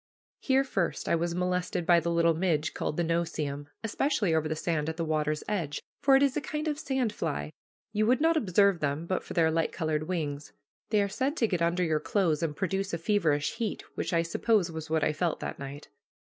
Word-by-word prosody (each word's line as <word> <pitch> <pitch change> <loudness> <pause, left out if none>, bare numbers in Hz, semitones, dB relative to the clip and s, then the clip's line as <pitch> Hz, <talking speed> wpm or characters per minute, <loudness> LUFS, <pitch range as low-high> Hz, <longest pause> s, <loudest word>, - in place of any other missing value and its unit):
Here 270 0 +3
first 195 -10 -2
I - - +2
was 170 +1 -1
molested 180 -1 -1
by 175 0 +6
the 170 +1 -2
little 170 0 +3
midge 160 -2 0
called - - -3
the 175 - +2
no 170 +1 +1
see 160 -2 -3
em, 145 +1 -6
especially 225 - +1
over 160 -1 +1
the 155 - -2
sand 155 -1 -1
at 160 - -5
the 165 - -1
water's 155 -1 0
edge, 165 -9 -2 0.2
for 275 -1 +6
it 270 - +5
is 275 -2 +2
a 300 - 0
kind 305 +1 -3
of 300 -1 -1
sand 260 -7 -1
fly. 75 - -3 0.4
You 215 +1 +2
would 255 +3 +4
not 325 +2 +3
observe 200 - +3
them 145 +2 -1
but 185 +2 -1
for - - -8
their 160 -2 +4
light 165 0 0
colored 155 -2 -2
wings. 150 -5 -3 0.4
They 210 -2 +3
are - - 0
said 265 +10 -1
to 230 - +3
get 180 -5 -1
under 170 +2 +2
your 160 -3 +1
clothes 170 -4 +1
and 160 -3 -1
produce 195 +1 -1
a - - -3
feverish 165 -6 +1
heat, 225 -2 -3
which - - -3
I 165 -1 +2
suppose 185 +1 +1
was 160 -1 -6
what 160 -1 +1
I 155 - +2
felt 165 +1 -1
that - - -5
night. 140 +1 -8
170 Hz, 230 wpm, -29 LUFS, 155-205 Hz, 0.4 s, by